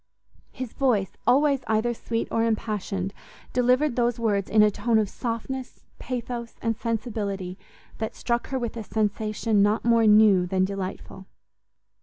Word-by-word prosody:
his 255 Hz, -3 st, -6 dB
voice, 225 Hz, -8 st, +1 dB, 0.2 s
always 280 Hz, +1 st, +4 dB
either 220 Hz, +2 st, +1 dB
sweet 230 Hz, 0 st, -3 dB
or 225 Hz, -, +1 dB
impassioned, 210 Hz, -4 st, -2 dB, 0.4 s
delivered 250 Hz, +2 st, +2 dB
those 240 Hz, -1 st, +1 dB
words 205 Hz, -4 st, 0 dB
in 215 Hz, -1 st, +5 dB
a 210 Hz, -, +4 dB
tone 230 Hz, +2 st, +1 dB
of 215 Hz, -2 st, +2 dB
softness, 250 Hz, +4 st, -5 dB, 0.2 s
pathos, 240 Hz, -2 st, -5 dB
and 230 Hz, -1 st, -1 dB
sensibility, 210 Hz, -5 st, -3 dB, 0.4 s
that 220 Hz, -1 st, -3 dB
struck 235 Hz, -1 st, -1 dB
her 265 Hz, -, -2 dB
with 235 Hz, -3 st, -3 dB
a 225 Hz, -, -5 dB
sensation 215 Hz, 0 st, 0 dB
not 210 Hz, +3 st, +2 dB
more 230 Hz, -1 st, +4 dB
new 210 Hz, -4 st, +6 dB
than 185 Hz, 0 st, +1 dB
delightful. 190 Hz, 0 st, -6 dB
225 Hz, 145 wpm, -25 LUFS, 205-240 Hz, 0.4 s, new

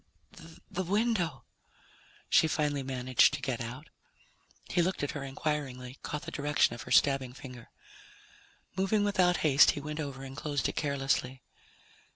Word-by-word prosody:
"The 190 Hz, -1 st, -2 dB
window," 185 Hz, -, 0 dB, 0.8 s
she -, -, +5 dB
finally 145 Hz, -2 st, 0 dB
managed 130 Hz, +1 st, +3 dB
to -, -, -6 dB
get 130 Hz, -3 st, -3 dB
out. 125 Hz, +6 st, -7 dB, 0.8 s
He 175 Hz, -, +1 dB
looked 180 Hz, -2 st, -1 dB
at 145 Hz, -, -1 dB
her 145 Hz, -, -5 dB
inquiringly, 135 Hz, -2 st, -4 dB
caught 150 Hz, -, -5 dB
the -, -, -7 dB
direction 145 Hz, -3 st, +2 dB
of 120 Hz, -, -7 dB
her -, -, -9 dB
stabbing 135 Hz, -3 st, +3 dB
finger. 125 Hz, -2 st, -11 dB, 1.1 s
Moving 195 Hz, +2 st, +1 dB
without 185 Hz, -4 st, +3 dB
haste, 145 Hz, -1 st, +7 dB
he -, -, -1 dB
went 150 Hz, +2 st, -5 dB
over 140 Hz, -3 st, -5 dB
and 135 Hz, 0 st, -8 dB
closed 145 Hz, -1 st, -1 dB
it -, -, -4 dB
carelessly. 135 Hz, -3 st, -1 dB
145 Hz, 150 wpm, -30 LUFS, 130-160 Hz, 1.1 s, haste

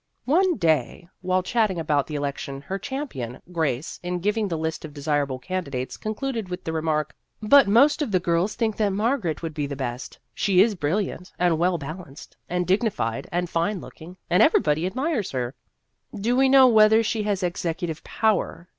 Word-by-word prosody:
One 355 Hz, +6 st, +3 dB
day, 160 Hz, -, 0 dB
while 185 Hz, 0 st, +1 dB
chatting 210 Hz, -3 st, +1 dB
about 150 Hz, -3 st, 0 dB
the 150 Hz, -, -5 dB
election, 140 Hz, -1 st, -4 dB
her 190 Hz, +7 st, -5 dB
champion, 195 Hz, -, -5 dB
Grace, 160 Hz, -4 st, -2 dB
in 180 Hz, 0 st, -3 dB
giving 210 Hz, +4 st, 0 dB
the 170 Hz, -4 st, -2 dB
list 160 Hz, 0 st, -3 dB
of 155 Hz, -2 st, -9 dB
desirable 145 Hz, -2 st, -1 dB
candidates, 140 Hz, -4 st, -4 dB
concluded 220 Hz, -1 st, -4 dB
with 180 Hz, 0 st, -5 dB
the 160 Hz, -, -4 dB
remark: 155 Hz, -2 st, -1 dB, 0.2 s
" -, -, -48 dB
But 280 Hz, -5 st, +8 dB
most 275 Hz, +9 st, +4 dB
of 275 Hz, -7 st, -1 dB
the 185 Hz, -, +3 dB
girls 175 Hz, +3 st, 0 dB
think 220 Hz, -3 st, -1 dB
that 210 Hz, -2 st, +2 dB
Margaret 205 Hz, -, -1 dB
would 165 Hz, -1 st, -4 dB
be 145 Hz, -1 st, -2 dB
the 140 Hz, -, -5 dB
best. 125 Hz, -1 st, -5 dB, 0.2 s
She 190 Hz, -, +2 dB
is 215 Hz, +3 st, +5 dB
brilliant 180 Hz, +2 st, -2 dB
and 175 Hz, -3 st, +2 dB
well 175 Hz, +1 st, +2 dB
balanced 155 Hz, -1 st, -9 dB
and 180 Hz, 0 st, 0 dB
dig 190 Hz, +3 st, +3 dB
nified 115 Hz, -, -2 dB
and 175 Hz, +1 st, -1 dB
fine 175 Hz, +4 st, -1 dB
looking, 170 Hz, +3 st, -12 dB
and 180 Hz, -, +3 dB
everybody 155 Hz, +3 st, +3 dB
admires 260 Hz, -, -1 dB
her." 125 Hz, -1 st, -2 dB, 0.3 s
" -, -, -19 dB
Do 235 Hz, +5 st, +1 dB
we 265 Hz, +1 st, +4 dB
know 265 Hz, -1 st, +7 dB
whether 220 Hz, -1 st, +6 dB
she 220 Hz, 0 st, -1 dB
has 205 Hz, -2 st, -1 dB
execu 175 Hz, 0 st, -2 dB
tive 160 Hz, -2 st, -6 dB
power?" 215 Hz, -5 st, -1 dB
180 Hz, 190 wpm, -24 LUFS, 155-215 Hz, 0.3 s, But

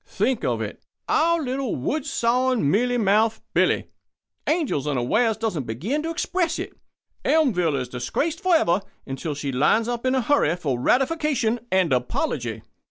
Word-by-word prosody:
Think 255 Hz, -3 st, -1 dB
of -, -, 0 dB
it! -, -, -7 dB, 0.3 s
Our 335 Hz, +1 st, +3 dB
little, 260 Hz, -1 st, -2 dB
wood 285 Hz, -, -2 dB
sawing, 245 Hz, -, +1 dB
mealy 245 Hz, +4 st, +2 dB
mouthed 215 Hz, +1 st, +2 dB
Billy! -, -, +1 dB, 0.6 s
Angel 290 Hz, -, 0 dB
unawares 205 Hz, -, +1 dB
doesn't 210 Hz, -, -2 dB
begin 195 Hz, -, -2 dB
to 325 Hz, -, -3 dB
express 340 Hz, +1 st, -1 dB
it. -, -, -5 dB, 0.5 s
Elmville 190 Hz, -, +2 dB
is 130 Hz, -2 st, -2 dB
disgraced 125 Hz, -, -2 dB
forever 315 Hz, -, +3 dB, 0.2 s
until 145 Hz, +3 st, -4 dB
she 140 Hz, -1 st, -3 dB
lines 150 Hz, -, +2 dB
up 240 Hz, -1 st, -3 dB
in 255 Hz, -, +2 dB
a 260 Hz, -, +2 dB
hurry 230 Hz, -, +2 dB
for 140 Hz, -8 st, -2 dB
ratification 265 Hz, -, +1 dB
and 185 Hz, -6 st, +3 dB
apology." 125 Hz, -1 st, -2 dB
225 Hz, 150 wpm, -24 LUFS, -, 0.6 s, Our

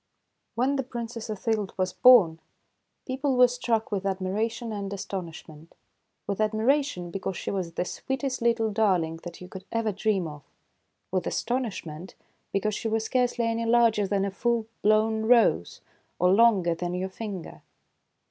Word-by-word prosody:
¥ -, -, -52 dB, 0.6 s
W -, -, +3 dB
HEN 280 Hz, +1 st, +1 dB
the -, -, +1 dB
Princess 235 Hz, -2 st, -6 dB
Othilde 215 Hz, -1 st, -2 dB
was 185 Hz, -1 st, -1 dB
born, 200 Hz, -11 st, +6 dB, 0.7 s
people 265 Hz, 0 st, -1 dB
were 250 Hz, 0 st, +8 dB
struck 240 Hz, -3 st, -1 dB
with 200 Hz, -2 st, -1 dB
admiration 200 Hz, +5 st, -2 dB
and 200 Hz, -1 st, -4 dB
astonish 190 Hz, -4 st, -6 dB
ment, 155 Hz, +1 st, -15 dB, 0.3 s
— -, -, -51 dB
with 200 Hz, +1 st, -2 dB
admiration, 220 Hz, -3 st, +1 dB
because 190 Hz, 0 st, -4 dB
she -, -, -4 dB
was 180 Hz, -4 st, -3 dB
the 180 Hz, -, -2 dB
sweetest 265 Hz, +4 st, -3 dB
little 230 Hz, -2 st, +2 dB
darling 185 Hz, -7 st, +1 dB
that 175 Hz, 0 st, -9 dB
you 180 Hz, -, -8 dB
could 190 Hz, 0 st, -9 dB
ever 230 Hz, -1 st, 0 dB
dream 200 Hz, -3 st, 0 dB
of; 150 Hz, -1 st, -9 dB, 0.7 s
with 185 Hz, -1 st, -1 dB
astonishment, 190 Hz, -9 st, -3 dB, 0.4 s
because 210 Hz, +2 st, 0 dB
she 225 Hz, -, -3 dB
was 220 Hz, 0 st, 0 dB
scarcely 245 Hz, 0 st, 0 dB
any 230 Hz, 0 st, -1 dB
larger 230 Hz, -3 st, +4 dB
than 195 Hz, 0 st, 0 dB
a 200 Hz, -, -2 dB
full 235 Hz, +3 st, 0 dB, 0.2 s
blown 220 Hz, +1 st, +2 dB
rose, 225 Hz, -, +3 dB, 0.4 s
or 180 Hz, +1 st, +3 dB
longer 200 Hz, -6 st, +4 dB
than 175 Hz, +1 st, -3 dB
your 185 Hz, +1 st, -2 dB
finger. 190 Hz, -2 st, -7 dB
215 Hz, 165 wpm, -27 LUFS, 185-235 Hz, 0.7 s, were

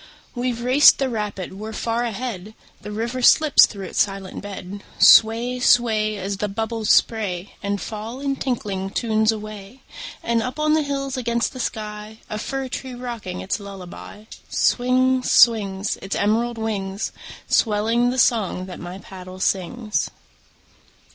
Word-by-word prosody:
We've 245 Hz, -1 st, -2 dB
raced 260 Hz, +4 st, +7 dB
the 270 Hz, -1 st, 0 dB
rapid, 210 Hz, -5 st, -4 dB
we're 215 Hz, +3 st, -7 dB
far 230 Hz, +2 st, -1 dB
ahead! 220 Hz, -3 st, -5 dB, 0.3 s
The 210 Hz, -, -8 dB
river 235 Hz, +4 st, -3 dB
slips 305 Hz, +4 st, +6 dB
through 195 Hz, -3 st, -8 dB
its -, -, 0 dB
silent 195 Hz, -2 st, -3 dB
bed. 200 Hz, 0 st, -8 dB, 0.2 s
Sway, 235 Hz, +3 st, +6 dB
sway, 220 Hz, -4 st, +3 dB
As 195 Hz, +1 st, -4 dB
the 210 Hz, -, -1 dB
bubbles 220 Hz, +1 st, -3 dB
spray 200 Hz, -5 st, +1 dB
And 200 Hz, 0 st, -2 dB
fall 225 Hz, +4 st, -6 dB
in 275 Hz, -1 st, -1 dB
tinkling 200 Hz, -7 st, -3 dB
tunes 220 Hz, 0 st, +1 dB
away. 215 Hz, +3 st, -8 dB, 0.4 s
And 230 Hz, -1 st, +1 dB
up 255 Hz, +5 st, -5 dB
on 305 Hz, 0 st, +2 dB
the 310 Hz, -, +3 dB
hills 275 Hz, -2 st, -3 dB
against 235 Hz, -2 st, -1 dB
the 255 Hz, -, -8 dB
sky, 215 Hz, -2 st, -5 dB
A 215 Hz, -, -3 dB
fir 270 Hz, +3 st, -3 dB
tree 255 Hz, 0 st, -6 dB
rocking 235 Hz, -7 st, -6 dB
its 195 Hz, -, -2 dB
lullaby, 200 Hz, +1 st, -10 dB, 0.2 s
Swings, 255 Hz, +1 st, +2 dB
swings, 205 Hz, -4 st, +3 dB
Its 195 Hz, -, -5 dB
emerald 230 Hz, +3 st, 0 dB
wings, 200 Hz, -3 st, -3 dB, 0.4 s
Swelling 225 Hz, +2 st, +2 dB
the 255 Hz, -, -2 dB
song 215 Hz, -7 st, +2 dB
that 185 Hz, -, -9 dB
my 175 Hz, +2 st, -7 dB
paddle 185 Hz, -1 st, -11 dB
sings. 210 Hz, +4 st, -1 dB
220 Hz, 150 wpm, -22 LUFS, 200-245 Hz, 0.4 s, raced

